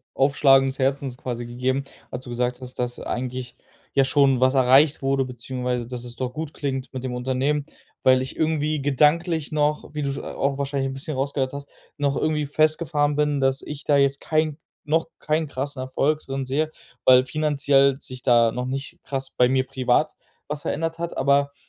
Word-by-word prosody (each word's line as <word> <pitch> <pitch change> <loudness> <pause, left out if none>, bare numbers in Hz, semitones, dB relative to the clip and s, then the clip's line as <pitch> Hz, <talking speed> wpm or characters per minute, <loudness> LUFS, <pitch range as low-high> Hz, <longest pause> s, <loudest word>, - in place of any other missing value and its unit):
Aufschlagen 135 -1 +4
des 135 - -7
Herzens 135 -1 0
quasi 120 -2 -5
gegeben, 125 +3 -1 0.3
als 125 - -6
du 120 - -8
gesagt 125 +1 -1
hast, 130 -1 -8
dass 120 0 -2
eigentlich 125 0 -4 0.4
ja 135 - +4
schon 135 -1 +3
was 130 +1 +4
erreicht 135 +3 +5
wurde, 135 0 +1
beziehungsweise 125 0 -3
dass 125 -1 -4
es 120 0 -6
doch 125 +1 -4
gut 155 0 -5
klingt 135 -3 -3
mit 130 -1 -6
dem 130 -1 -3
Unternehmen, 130 +4 -1 0.4
weil 130 0 +5
ich 130 - -6
irgendwie 155 -2 0
gedanklich 150 +3 +2
noch, 150 0 0
wie 150 - -3
du 140 -1 -1
sch 135 - -4
a - - -7
auch 140 0 -1
wahrscheinlich 140 -1 -1
'n 135 - -5
bisschen 135 +2 -3
rausgehört 135 -1 -1
hast, 140 0 -7 0.3
noch 140 -1 0
irgendwie 155 -1 0
festgefahren 150 -1 +2
bin, 150 -1 +1
dass 135 0 +2
ich 150 -1 -7
da 145 - +2
jetzt 140 0 +2
kein 155 -1 0 0.3
noch 160 +2 +1
kein 155 +1 -1
krassen 140 -1 -3
Erfolg 140 +4 0
drin 135 0 -3
sehe, 150 +4 0 0.4
weil 130 0 +7
finanziell 140 -1 +2
sich 130 -1 -6
da 120 -3 +4
noch 125 +2 -3
nicht 135 +2 -5
krass 135 -1 -4
bei 125 - +3
mir 130 0 +1
privat 130 +1 +1 0.4
was 150 -1 -4
verändert 165 +1 -2
hat. 170 0 -4
Aber, 140 +1 +2
135 Hz, 190 wpm, -24 LUFS, 130-145 Hz, 0.4 s, weil